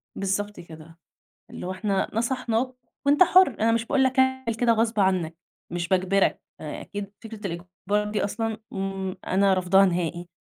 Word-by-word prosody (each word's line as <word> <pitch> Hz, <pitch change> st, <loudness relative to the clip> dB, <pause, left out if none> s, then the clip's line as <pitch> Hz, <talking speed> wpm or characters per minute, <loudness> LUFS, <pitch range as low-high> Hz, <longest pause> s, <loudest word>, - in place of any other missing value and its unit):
بالضبط 205 Hz, +1 st, -2 dB
كده، 165 Hz, 0 st, -12 dB, 0.5 s
اللي 180 Hz, -, -6 dB
إحنا 195 Hz, 0 st, -1 dB
نصحناك، 240 Hz, +1 st, -1 dB, 0.3 s
وأنت 290 Hz, +5 st, +6 dB
حُر، 370 Hz, 0 st, +6 dB
أنا 225 Hz, +1 st, +3 dB
مش 230 Hz, 0 st, 0 dB
باقول 270 Hz, +2 st, +2 dB
لك 260 Hz, -1 st, +2 dB, 0.5 s
كده 240 Hz, -1 st, +4 dB
غصب 225 Hz, -1 st, +1 dB
عنّك 185 Hz, -4 st, +1 dB, 0.4 s
مش 170 Hz, 0 st, -2 dB
باجبرك، 190 Hz, +2 st, +2 dB, 0.2 s
أكيد 200 Hz, +6 st, -6 dB
فكرة 220 Hz, -2 st, -6 dB
الإجبار 185 Hz, +4 st, -3 dB
دي 210 Hz, -, 0 dB
أصلًا 220 Hz, +2 st, -2 dB, 0.2 s
إمم، 195 Hz, -1 st, -3 dB
أنا 195 Hz, +1 st, +3 dB
رفضاها 190 Hz, +1 st, +4 dB
نهائي، 175 Hz, -1 st, -2 dB
195 Hz, 145 wpm, -25 LUFS, 185-225 Hz, 0.5 s, وأنت